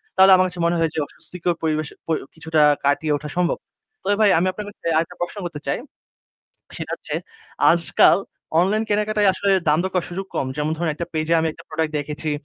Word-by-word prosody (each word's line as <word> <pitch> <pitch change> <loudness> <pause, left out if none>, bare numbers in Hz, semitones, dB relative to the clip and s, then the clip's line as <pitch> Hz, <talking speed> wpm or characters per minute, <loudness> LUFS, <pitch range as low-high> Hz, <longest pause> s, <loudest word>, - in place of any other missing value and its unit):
তাহলে 190 0 +7
আমার 185 0 +4
কাছে 180 -1 -8
মনে 170 - +2
হয় 165 -1 +2
যে - - -2
অস্বস্তিকর 175 +3 -4
পরিবেশ 155 -1 0 0.2
প - - -14 0.2
কিছুটা 160 -1 0 0.2
কাটিয়ে 150 +2 +2
ওঠা 150 0 -8
সম্ভব। 180 -1 +1 0.5
তবে 205 - +2
ভাই 210 - +6
আমি 185 - +1
আপনার 210 +2 -7
কাছে 205 - -18
আরেকটা 165 +1 -1
প্রশ্ন 175 +4 -3
করতে 155 -4 -5
চাই। - - +1 1.0
সেটা - - -5
হচ্ছে - - -7 0.6
আজকাল 170 +2 +4 0.4
অনলাইন 210 +5 +1
কেনাকাটায় 210 -1 +2
আসলে 200 - 0 0.2
দাম 150 +1 +4
দর 190 - -2
করার 180 - 0
সুযোগ 190 +2 -4
কম। - - 0
যেমন 150 +1 -1
ধরেন 165 -1 -1
একটা 170 +2 -4
পেইজে 155 +1 -1
আমি 160 - 0
একটা - - -15
product 155 0 -2
দেখেছি। 150 +1 -4
170 Hz, 200 wpm, -22 LUFS, 155-190 Hz, 1.0 s, তাহলে